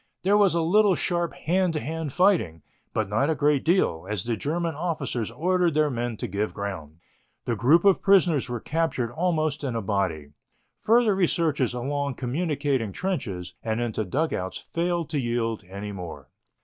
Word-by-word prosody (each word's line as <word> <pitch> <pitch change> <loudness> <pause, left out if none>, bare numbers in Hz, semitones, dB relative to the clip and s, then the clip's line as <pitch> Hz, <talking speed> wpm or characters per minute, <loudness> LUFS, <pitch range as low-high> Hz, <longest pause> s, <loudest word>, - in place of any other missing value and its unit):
There 195 +3 +4
was 200 -4 +4
a 170 - +2
little 200 +3 +4
sharp 175 -1 -1
hand 180 +1 +1
to 155 - -1
hand 160 -1 -4
fighting, 165 - +2 0.3
but 110 -2 -1
not 115 +9 +1
a 160 - +1
great 145 -2 +2
deal, 165 - +1
as 105 -4 -2
the 115 -1 -1
German 165 +7 -2
officers 145 - -2
ordered 175 +5 +1
their 150 -1 +3
men 120 -2 -3
to - - -4
give 100 +3 -2
ground. 85 -7 -5 0.5
The 120 - 0
group 145 - +4
of 195 -2 +5
prisoners 175 -9 +3
were 120 -1 -3
captured 150 -5 -1
almost 155 0 0
in 130 -4 -2
a 115 - -1
body. 90 -8 -1 0.5
Further 230 -1 +4
researches 160 - +1
along 140 +2 -2
communicating 140 - -1
trenches 100 - -3
and 110 0 -2
into 115 -2 -1
dugouts 100 - -2
failed 170 -1 -2
to 150 - 0
yield 115 -3 -1
any 100 +2 -6
more. 90 -4 -8
145 Hz, 170 wpm, -25 LUFS, 110-170 Hz, 0.5 s, of